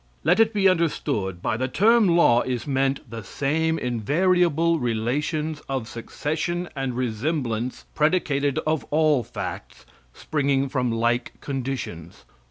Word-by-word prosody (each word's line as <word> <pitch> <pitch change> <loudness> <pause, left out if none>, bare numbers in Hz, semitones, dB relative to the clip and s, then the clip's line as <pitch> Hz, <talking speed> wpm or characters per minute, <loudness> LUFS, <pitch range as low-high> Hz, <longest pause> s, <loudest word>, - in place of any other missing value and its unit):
Let 175 +7 +3
it 225 -1 +5
be 200 -3 +3
understood 140 - 0
by 110 - 0
the 130 +2 -1
term 215 - +4
Law 120 -8 +5
is 125 -2 -3
meant 135 -1 0
the 115 -1 -7
same 160 - 0
invariable 165 - +2
relations 145 +7 -1
of 130 -4 -2
succession 160 +9 -3
and 135 -3 -3
resemblance 125 0 -2
predicated 150 -3 +1
of 155 -2 0
all 155 -3 +3
facts - - -7 0.3
springing 140 - 0
from 125 -3 0
like 120 +2 0
conditions. 130 - -5
140 Hz, 125 wpm, -24 LUFS, 120-160 Hz, 0.3 s, it